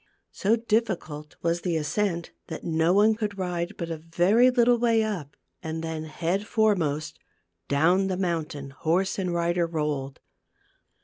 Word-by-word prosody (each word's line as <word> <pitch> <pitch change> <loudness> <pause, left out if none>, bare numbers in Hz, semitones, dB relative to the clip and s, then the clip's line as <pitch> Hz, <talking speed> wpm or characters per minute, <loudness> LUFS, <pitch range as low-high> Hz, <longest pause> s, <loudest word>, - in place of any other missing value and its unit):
So 210 +4 +2
difficult 200 -10 -2
was 170 0 +1
the 175 -3 0
ascent 170 +3 -1 0.2
that 160 - -6
no 160 +1 +2
one 210 +3 +5
could 210 -2 -3
ride 175 -2 -2
but 170 -1 -4
a 165 - -3
very 175 +10 +3
little 245 -1 +4
way 230 -2 +3
up, 180 -10 -4 0.2
and 160 0 -4
then, 160 -1 -4
head 175 +6 -2
foremost, 165 -9 +1 0.5
down 175 - +3
the 185 -1 -1
mountain 160 -6 -3
horse 175 +8 0
and 185 -2 -1
rider 170 0 +1
rolled. 150 -4 -3
170 Hz, 145 wpm, -26 LUFS, 160-205 Hz, 0.5 s, one